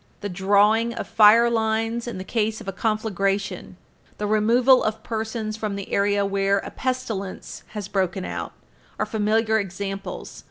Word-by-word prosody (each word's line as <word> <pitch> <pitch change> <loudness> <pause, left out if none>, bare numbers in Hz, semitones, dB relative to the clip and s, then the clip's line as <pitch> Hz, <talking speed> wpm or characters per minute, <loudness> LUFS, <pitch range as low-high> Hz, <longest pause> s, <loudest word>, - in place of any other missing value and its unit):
The 205 - -3
drawing 205 +5 +3
of - - -5
fire 225 +2 +6
lines 225 +1 0
in 235 - -5
the 185 - -5
case 220 +1 -1
of - - -11
a - - -1
conflagration, 200 -2 -2 0.4
the 210 - -3
removal 235 +5 +4
of 220 0 -2
persons 220 -1 -3
from 215 -2 -3
the 200 0 -7
area 200 0 +2
where 195 0 +1
a - - -5
pestilence 225 -7 -4 0.2
has 205 -2 -4
broken 190 -2 -1
out, - - -5 0.5
are - - 0
familiar 220 +1 +1
examples. 195 0 -5
215 Hz, 155 wpm, -23 LUFS, 200-225 Hz, 0.5 s, fire